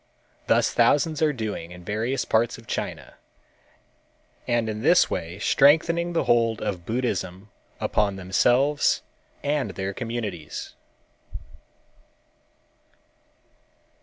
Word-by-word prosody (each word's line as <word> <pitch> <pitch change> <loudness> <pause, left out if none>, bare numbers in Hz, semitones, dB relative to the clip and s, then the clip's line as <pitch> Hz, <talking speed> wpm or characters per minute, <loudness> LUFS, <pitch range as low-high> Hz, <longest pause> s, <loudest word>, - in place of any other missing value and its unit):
Thus - - +3
thousands 150 +1 +2
are 155 -1 +4
doing 110 - -5
in 90 0 -11
various 115 +7 -1
parts 115 +1 +1
of 115 - -15
China, - - -5 1.3
and 120 -2 +1
in 110 0 -4
this - - +4
way 85 +3 -4
strengthening 165 +9 +3
the 165 - +1
hold 115 -2 +2
of 95 -5 -4
Buddhism 100 -5 -3 0.3
upon 100 -2 0
themselves 125 - +2 0.4
and 145 -1 0
their 95 0 -3
communities. 110 -9 -5
115 Hz, 100 wpm, -25 LUFS, 100-135 Hz, 1.3 s, are